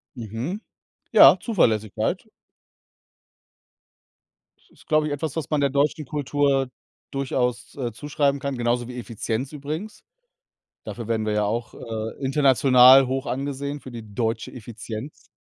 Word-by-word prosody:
Mhm, 120 - -5 0.5
ja, - - +8
Zuverlässigkeit. 110 - 0 2.3
Das - - -30
ist, - - -22
glaube 155 -1 +2
ich, 145 - -2
etwas, 145 0 -4
was 160 -4 -4
man 150 -2 +1
der 140 - +3
deutschen 145 +2 0
Kultur 140 -2 0 0.4
durchaus, 130 -3 -2
äh, 125 -4 -3
zuschreiben 140 +3 -1
kann, 140 -1 -3
genauso 120 0 0
wie 125 0 -8
Effizienz 120 +2 -4
übrigens. 155 +8 -6 0.8
Dafür 120 -3 -6
werden 110 -1 -1
wir 105 - 0
ja 105 0 +1
auch, 115 +3 -3
äh, 110 +3 -6
international 130 -1 +6
hoch 135 +2 -2
angesehen 140 +2 -3
für 130 - -11
die 110 -3 -10
deutsche 115 +1 -2
Effizienz 115 +2 -8
130 Hz, 130 wpm, -24 LUFS, 115-145 Hz, 2.3 s, ja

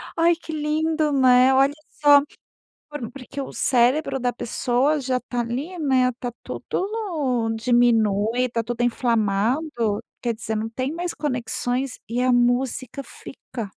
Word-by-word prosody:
Ai, 335 +1 +4
que 325 -1 -9
lindo, 310 0 0
né, 255 -1 +5
olha 275 +2 +4 0.2
só, 290 -1 +5 0.7
por 295 -6 -6
porque 275 +1 -9
o 270 - -5
cérebro 265 +3 +2
da 245 -1 -1
pessoa 255 +5 0
já 255 -1 -1
tá 245 0 -5
ali, 265 +10 -4
né, 260 -4 +2
tá 245 -1 -4
tudo - - -8 0.2
no 280 - -1
diminui, 230 0 +2
tá 230 -1 -1
tudo 240 +1 -4
inflamado. 235 +4 +1 0.5
Quer 240 -1 0
dizer, 220 0 -4
não 220 +1 -2
tem 255 +4 -3
mais 345 +2 -4
conexões 250 -1 -2
e 245 +2 -1
a 255 0 +3
música 245 +2 0
fica. 255 -1 -9
255 Hz, 145 wpm, -23 LUFS, 240-290 Hz, 0.7 s, né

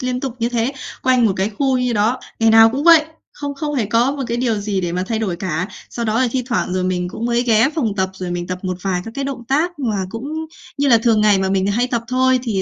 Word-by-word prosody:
liên 255 -1 -2
tục 260 -2 -4
như 230 0 0
thế 240 +2 -1 0.3
quanh 255 -2 +3
một 205 - +2
cái 195 +3 0
khu 260 +3 0
như 250 -1 0
đó. 225 +4 +1 0.2
Ngày 225 0 +4
nào 225 0 +7
cũng 275 +6 -3
vậy, 330 -2 +7 0.3
không 285 -1 -5
không 295 +1 -3
hề 230 -6 0
có 235 +6 +2
một 285 - -4
cái 235 0 -2
điều 240 -2 0
gì 200 -2 -2
để 175 -1 -3
mà 180 +1 -1
thay 225 -1 -1
đổi 190 -6 -2
cả. 180 +1 -3 0.2
Sau 235 - -4
đó 220 +2 +1
là 255 - +2
thi 255 0 -1
thoảng 235 -7 -1
rồi 185 0 -1
mình 180 -1 -1
cũng 225 - -6
mới 240 0 +1
ghé 230 +1 +3
phòng 230 -10 -1
tập, 190 0 0
rồi 185 -2 -5
mình 175 0 -3
tập 180 0 -4
một 185 -1 -2
vài 185 -2 -1
các 225 - -7
cái 275 -1 -3
động 270 -3 -5
tác 310 +4 0
mà 225 -7 -1
cũng 225 +5 -6 0.5
như 285 - +2
là 235 -3 +6
thường 225 -1 +2
ngày 210 -2 +4
mà 190 0 0
mình 190 0 +1
hay 230 +5 +1
tập 235 -2 -2
thôi. 255 0 +2
Thì, 215 -6 -1
230 Hz, 285 wpm, -19 LUFS, 195-255 Hz, 0.5 s, nào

